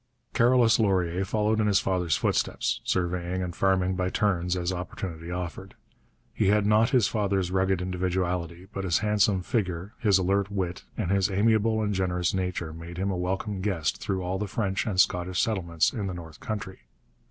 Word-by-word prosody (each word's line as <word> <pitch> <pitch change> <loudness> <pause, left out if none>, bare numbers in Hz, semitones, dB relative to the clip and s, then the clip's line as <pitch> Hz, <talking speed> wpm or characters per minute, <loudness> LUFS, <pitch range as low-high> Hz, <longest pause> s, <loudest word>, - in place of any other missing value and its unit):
Carolus 120 -2 +4
Laurier 95 -4 +1
followed 105 +2 0
in 110 - +2
his 100 -3 +4
father's 90 -4 0
footsteps, - - 0
surveying 90 0 -1
and 90 -2 -5
farming 95 -1 +2
by 90 0 0
turns 90 -3 0
as 90 +1 -1
opportunity 90 -2 -6
offered. 90 -2 -5 0.6
He - - +1
had 105 +1 +3
not 110 +2 +4
his 125 -7 +3
father's 100 -4 0
rugged 95 -1 +1
individuality, 90 -1 -2
but 95 - -3
his 85 -4 +2
handsome 105 -3 +2
figure, 95 -1 -2
his 105 -5 +4
alert 95 +1 +1
wit, 90 -8 -3
and 85 - -1
his 100 -2 +2
amiable 110 +2 +2
and 105 -1 0
generous 90 -2 0
nature 90 -4 -2
made 85 +1 -9
him 95 +2 -1
a - - -1
welcome 95 +3 -2
guest 80 -10 -1
through 95 -3 -2
all 95 +2 -2
the 105 - -2
French 100 +1 -1
and 95 -4 -1
Scottish 90 -1 +2
settlements 85 -7 +1
in 105 -6 -3
the 90 - -4
north 80 -3 -10
country. 100 -3 -5
95 Hz, 175 wpm, -27 LUFS, 90-100 Hz, 0.6 s, Carolus